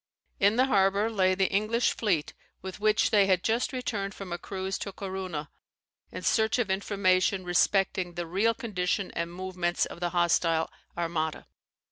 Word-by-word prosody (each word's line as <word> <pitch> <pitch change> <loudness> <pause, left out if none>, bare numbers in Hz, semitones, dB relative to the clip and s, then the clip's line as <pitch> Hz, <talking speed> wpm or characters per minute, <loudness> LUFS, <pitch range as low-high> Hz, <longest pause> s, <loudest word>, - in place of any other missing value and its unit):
In 200 +2 +4
the 255 +2 +4
harbour 200 -2 +2
lay 185 -3 +2
the 190 0 +1
English 215 +4 +1
fleet 180 -9 0 0.3
with 190 +1 -7
which 215 0 +2
they 205 -2 +5
had 185 -2 +2
just 230 +5 0
returned 210 -7 -3
from 190 -3 -6
a 175 - -4
cruise 190 0 -4
to 200 - -5
Corunna 185 -6 -5 0.6
in - - -7
search 220 +1 +2
of 225 -6 0
information 190 -1 +1
respecting 180 0 +1
the 175 -1 -3
real 200 +7 +1
condition 195 -3 -2
and 170 0 -3
movements 180 -1 -1
of - - -9
the 175 0 -1
hostile, 170 -2 +1 0.3
Armada. 165 -2 -2
190 Hz, 160 wpm, -28 LUFS, 175-205 Hz, 0.6 s, they